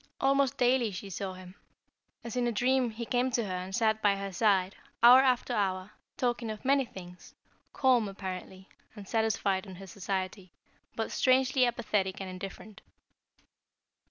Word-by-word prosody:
Almost 275 Hz, -1 st, +2 dB
daily 245 Hz, -2 st, +3 dB
she 195 Hz, 0 st, -7 dB
saw 190 Hz, +1 st, -4 dB
him. 185 Hz, 0 st, -12 dB, 0.7 s
As 235 Hz, -1 st, -6 dB
in 245 Hz, -1 st, +1 dB
a -, -, +1 dB
dream 250 Hz, +2 st, +1 dB
he 230 Hz, +1 st, -6 dB
came 245 Hz, +2 st, +1 dB
to 235 Hz, -3 st, -1 dB
her 190 Hz, -, -4 dB
and 185 Hz, +1 st, -5 dB
sat 220 Hz, -2 st, +1 dB
by 205 Hz, -1 st, +3 dB
her 195 Hz, -1 st, -5 dB
side, 195 Hz, -2 st, +2 dB, 0.3 s
hour 245 Hz, +2 st, +10 dB
after 250 Hz, -1 st, +1 dB
hour, 190 Hz, -2 st, -1 dB, 0.3 s
talking 240 Hz, -2 st, -1 dB
of 215 Hz, +3 st, -7 dB
many 275 Hz, 0 st, +3 dB
things, 180 Hz, -5 st, -12 dB, 0.4 s
calm, 255 Hz, -5 st, +3 dB
apparently, 190 Hz, -1 st, -7 dB, 0.3 s
and 205 Hz, -3 st, -10 dB
satisfied 205 Hz, -3 st, 0 dB
in 190 Hz, -, -9 dB
her 195 Hz, +2 st, -10 dB
society, 190 Hz, -1 st, -5 dB, 0.4 s
but 225 Hz, -, -3 dB
strangely 260 Hz, 0 st, +3 dB
apathetic 210 Hz, -5 st, -1 dB
and 190 Hz, -1 st, -6 dB
indifferent. 195 Hz, +3 st, -9 dB
210 Hz, 155 wpm, -30 LUFS, 190-245 Hz, 0.7 s, hour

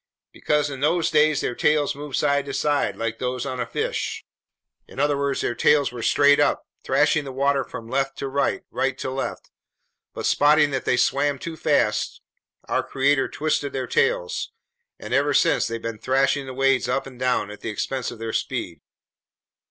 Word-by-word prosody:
"Because 150 Hz, -1 st, 0 dB
in 135 Hz, -, -6 dB
those 165 Hz, +4 st, +1 dB
days 155 Hz, -1 st, +3 dB
their -, -, -2 dB
tails 150 Hz, +3 st, +2 dB
moved 145 Hz, -1 st, -6 dB
side 140 Hz, -1 st, +1 dB
to 140 Hz, -1 st, -5 dB
side, 145 Hz, +1 st, 0 dB
like 115 Hz, 0 st, -3 dB
those 125 Hz, -1 st, -2 dB
on 130 Hz, -1 st, -2 dB
fish, -, -, -3 dB, 0.6 s
in -, -, -11 dB
other 145 Hz, 0 st, +2 dB
words, 140 Hz, 0 st, -1 dB
their -, -, -1 dB
tails 145 Hz, +4 st, +3 dB
were 120 Hz, -1 st, -7 dB
straight 145 Hz, +4 st, +4 dB
up, 145 Hz, -, +2 dB, 0.2 s
thrashing 145 Hz, +3 st, +2 dB
the 135 Hz, -, -7 dB
water 140 Hz, +1 st, +1 dB
from 115 Hz, -2 st, -9 dB
left 135 Hz, +2 st, -1 dB
to 140 Hz, -, -3 dB
right, 140 Hz, +1 st, -1 dB
right 135 Hz, 0 st, -1 dB
to 130 Hz, -, -4 dB
left. 135 Hz, +1 st, -5 dB, 0.6 s
But -, -, -4 dB
spotting 150 Hz, 0 st, +4 dB
that 135 Hz, -1 st, -2 dB
they 125 Hz, -, +2 dB
swam 140 Hz, +2 st, +1 dB
too 165 Hz, +4 st, -6 dB
fast, 105 Hz, -9 st, 0 dB, 0.5 s
our -, -, +1 dB
Creator 135 Hz, 0 st, +1 dB
twisted 150 Hz, -2 st, -1 dB
their 130 Hz, -1 st, -2 dB
tails, 470 Hz, +1 st, 0 dB, 0.5 s
and -, -, -7 dB
ever 145 Hz, +1 st, +2 dB
since -, -, +3 dB
they've 115 Hz, 0 st, -4 dB
been 115 Hz, -1 st, -5 dB
thrashing 135 Hz, +2 st, +1 dB
the 130 Hz, -, -7 dB
waves 135 Hz, -1 st, +2 dB
up 135 Hz, -, 0 dB
and 130 Hz, -2 st, -12 dB
down, 125 Hz, -5 st, 0 dB
at 105 Hz, -, -11 dB
the -, -, -4 dB
expense 125 Hz, +4 st, -3 dB
of 120 Hz, -, -9 dB
their 115 Hz, 0 st, -5 dB
speed." -, -, -3 dB
135 Hz, 185 wpm, -23 LUFS, 130-145 Hz, 0.6 s, straight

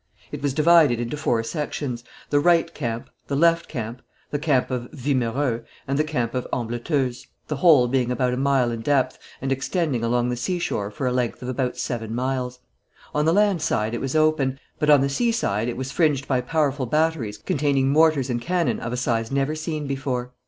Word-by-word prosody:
It -, -, -6 dB
was 140 Hz, -2 st, -1 dB
divided 155 Hz, -6 st, +5 dB
into 120 Hz, +4 st, -3 dB
four 120 Hz, -6 st, 0 dB
sections, 135 Hz, -3 st, -4 dB, 0.3 s
the 145 Hz, -, +4 dB
right 170 Hz, +1 st, +3 dB
camp, 115 Hz, -6 st, -4 dB, 0.2 s
the 140 Hz, -, -1 dB
left 170 Hz, +3 st, +3 dB
camp, 120 Hz, -2 st, -5 dB, 0.3 s
the 145 Hz, -, -1 dB
camp 140 Hz, -4 st, +1 dB
of 125 Hz, -1 st, -3 dB
Wimereux, 125 Hz, -2 st, -1 dB, 0.2 s
and 140 Hz, +2 st, 0 dB
the -, -, +4 dB
camp 125 Hz, -7 st, -2 dB
of 125 Hz, -1 st, -2 dB
Ambleteuse, 125 Hz, +2 st, -2 dB, 0.2 s
the 150 Hz, -, -2 dB
whole 140 Hz, -5 st, +6 dB
being 125 Hz, -1 st, +1 dB
about 125 Hz, 0 st, +1 dB
a -, -, -2 dB
mile 135 Hz, -3 st, +2 dB
in 115 Hz, -1 st, -4 dB
depth, 135 Hz, +1 st, +1 dB, 0.2 s
and 135 Hz, -, -1 dB
extending 135 Hz, -2 st, -1 dB
along 120 Hz, +1 st, +1 dB
the 125 Hz, -, -1 dB
seashore 125 Hz, -, -2 dB
for 130 Hz, +6 st, -5 dB
a 125 Hz, -, +1 dB
length 125 Hz, -1 st, -1 dB
of 125 Hz, -, -4 dB
about 130 Hz, -1 st, -2 dB
seven 115 Hz, -2 st, -3 dB
miles. 125 Hz, 0 st, -2 dB, 0.5 s
On 150 Hz, 0 st, +1 dB
the 160 Hz, -, +4 dB
land 200 Hz, -3 st, +3 dB
side 110 Hz, -8 st, 0 dB
it 120 Hz, -, -3 dB
was 135 Hz, +2 st, -3 dB
open, 155 Hz, -4 st, +2 dB, 0.2 s
but 150 Hz, -, +1 dB
on 145 Hz, -2 st, +7 dB
the 140 Hz, -, +2 dB
sea 230 Hz, -, +1 dB
side 115 Hz, -, 0 dB
it 120 Hz, -, -3 dB
was 130 Hz, +1 st, -4 dB
fringed 145 Hz, -5 st, +1 dB
by 130 Hz, -2 st, +1 dB
powerful 140 Hz, -1 st, 0 dB
batteries 150 Hz, -7 st, 0 dB
containing 140 Hz, +1 st, +1 dB
mortars 150 Hz, -3 st, +3 dB
and 120 Hz, -1 st, -1 dB
cannon 175 Hz, +3 st, 0 dB
of 120 Hz, -, -4 dB
a 125 Hz, -, -2 dB
size 115 Hz, -2 st, -1 dB
never 140 Hz, +2 st, 0 dB
seen 155 Hz, -1 st, -4 dB
before. 130 Hz, -3 st, -3 dB
135 Hz, 200 wpm, -23 LUFS, 120-150 Hz, 0.5 s, on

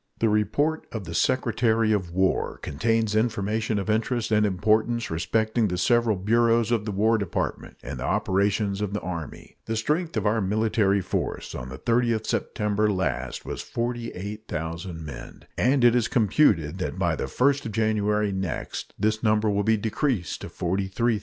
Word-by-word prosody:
The 115 Hz, -, +2 dB
report 145 Hz, +9 st, +1 dB
of 110 Hz, -3 st, -4 dB
the 85 Hz, -2 st, -7 dB
Secretary 115 Hz, -1 st, +2 dB
of 95 Hz, -5 st, 0 dB
War 95 Hz, +2 st, 0 dB
contains 110 Hz, +7 st, 0 dB
information 110 Hz, -1 st, 0 dB
of 100 Hz, -, -2 dB
interest 110 Hz, +2 st, 0 dB
and 105 Hz, -1 st, +4 dB
importance 110 Hz, +4 st, +1 dB
respecting 110 Hz, +7 st, +1 dB
the 90 Hz, -2 st, -2 dB
several 115 Hz, +3 st, +3 dB
bureaus 115 Hz, +3 st, +2 dB
of 115 Hz, -3 st, +1 dB
the 105 Hz, -, -2 dB
War 110 Hz, +3 st, +2 dB
Department 100 Hz, -4 st, -3 dB
and -, -, -6 dB
the -, -, -4 dB
operations 100 Hz, +1 st, +1 dB
of 100 Hz, -1 st, -2 dB
the 105 Hz, -, -1 dB
Army. 85 Hz, -3 st, -7 dB
The 110 Hz, -, -2 dB
strength 150 Hz, +6 st, -1 dB
of 110 Hz, -, -1 dB
our 110 Hz, +2 st, +2 dB
military 105 Hz, 0 st, +2 dB
force 90 Hz, -, -3 dB
on 65 Hz, +1 st, -6 dB
the 65 Hz, -, -7 dB
30th 120 Hz, -, +2 dB
of 110 Hz, 0 st, -4 dB
September 105 Hz, 0 st, 0 dB
last 70 Hz, -10 st, -2 dB
was -, -, -4 dB
48,000 95 Hz, -8 st, -4 dB
men, 75 Hz, -, -9 dB
and 130 Hz, +1 st, +2 dB
it 120 Hz, -1 st, +6 dB
is 120 Hz, -1 st, +2 dB
computed 105 Hz, -, +2 dB
that -, -, -3 dB
by -, -, +1 dB
the -, -, -3 dB
1st 135 Hz, -, +1 dB
of -, -, -5 dB
January 105 Hz, -1 st, +1 dB
next 95 Hz, -3 st, -4 dB
this 110 Hz, +1 st, 0 dB
number 110 Hz, -1 st, +2 dB
will 100 Hz, 0 st, +1 dB
be 110 Hz, +1 st, +3 dB
decreased 110 Hz, -, -1 dB
to -, -, -6 dB
43,000. 100 Hz, +5 st, -1 dB
105 Hz, 170 wpm, -25 LUFS, 95-115 Hz, -, it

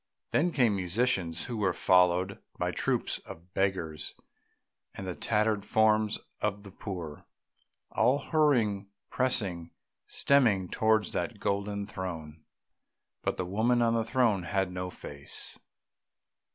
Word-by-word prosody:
Then 175 Hz, +4 st, +2 dB
came 120 Hz, -9 st, +3 dB
musicians 90 Hz, -3 st, 0 dB
who 120 Hz, -, -4 dB
were 95 Hz, -4 st, +1 dB
followed 90 Hz, +1 st, +3 dB, 0.2 s
by -, -, 0 dB
troops -, -, -1 dB
of 85 Hz, +3 st, -12 dB
beggars 90 Hz, -6 st, -1 dB, 0.8 s
and 95 Hz, -, -6 dB
the 90 Hz, -, -3 dB
tattered 105 Hz, +1 st, +1 dB
forms 110 Hz, 0 st, +3 dB, 0.2 s
of 105 Hz, -1 st, -2 dB
the 100 Hz, -, -10 dB
poor, 90 Hz, -7 st, -7 dB, 0.6 s
all 125 Hz, +5 st, +3 dB
hurrying, 125 Hz, -10 st, +2 dB, 0.2 s
pressing, 95 Hz, -10 st, 0 dB, 0.4 s
streaming 110 Hz, -10 st, +3 dB
towards 110 Hz, -1 st, +2 dB
that -, -, -3 dB
golden 100 Hz, 0 st, -1 dB
throne.... 80 Hz, -7 st, -6 dB, 0.8 s
But -, -, -1 dB
the 90 Hz, -, -1 dB
woman 115 Hz, +6 st, +2 dB
on 115 Hz, 0 st, +3 dB
the 115 Hz, -1 st, +2 dB
throne 115 Hz, -5 st, +2 dB
had 95 Hz, +1 st, -1 dB
no 90 Hz, 0 st, -4 dB
face. 70 Hz, -5 st, -4 dB
100 Hz, 125 wpm, -30 LUFS, 90-110 Hz, 0.8 s, came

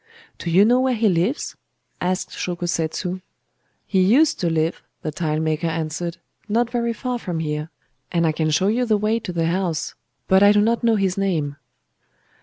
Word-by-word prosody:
'Do 170 Hz, -, -4 dB
you 185 Hz, +5 st, +6 dB
know 245 Hz, +3 st, +4 dB
where 260 Hz, -1 st, +2 dB
he 225 Hz, 0 st, +2 dB
lives?' 190 Hz, -, 0 dB, 0.5 s
asked 185 Hz, +1 st, -1 dB
Shōko 175 Hz, -1 st, -3 dB
Setsu. 175 Hz, +3 st, -2 dB, 0.6 s
'He 190 Hz, -2 st, +2 dB
used 255 Hz, +12 st, +4 dB
to 175 Hz, -, +1 dB
live,' 160 Hz, +1 st, 0 dB, 0.2 s
the 155 Hz, -, -2 dB
tilemaker 155 Hz, 0 st, -1 dB
answered, 165 Hz, +1 st, -3 dB, 0.3 s
'not 235 Hz, +2 st, +1 dB
very 235 Hz, -1 st, 0 dB
far 245 Hz, +2 st, -3 dB
from 175 Hz, -6 st, -4 dB
here; 150 Hz, 0 st, -3 dB, 0.4 s
and 170 Hz, -1 st, +2 dB
I 160 Hz, -, +3 dB
can 155 Hz, 0 st, -1 dB
show 170 Hz, +5 st, +2 dB
you 235 Hz, +4 st, +2 dB
the 215 Hz, -2 st, +3 dB
way 215 Hz, +2 st, +1 dB
to 185 Hz, -, -6 dB
the 165 Hz, -2 st, 0 dB
house. 170 Hz, -2 st, -1 dB, 0.3 s
But 190 Hz, 0 st, +5 dB
I 205 Hz, 0 st, +7 dB
do 205 Hz, -, +4 dB
not 230 Hz, +3 st, +1 dB
know 230 Hz, -1 st, +4 dB
his 195 Hz, -2 st, 0 dB
name. 160 Hz, -8 st, 0 dB
185 Hz, 185 wpm, -22 LUFS, 165-215 Hz, 0.6 s, I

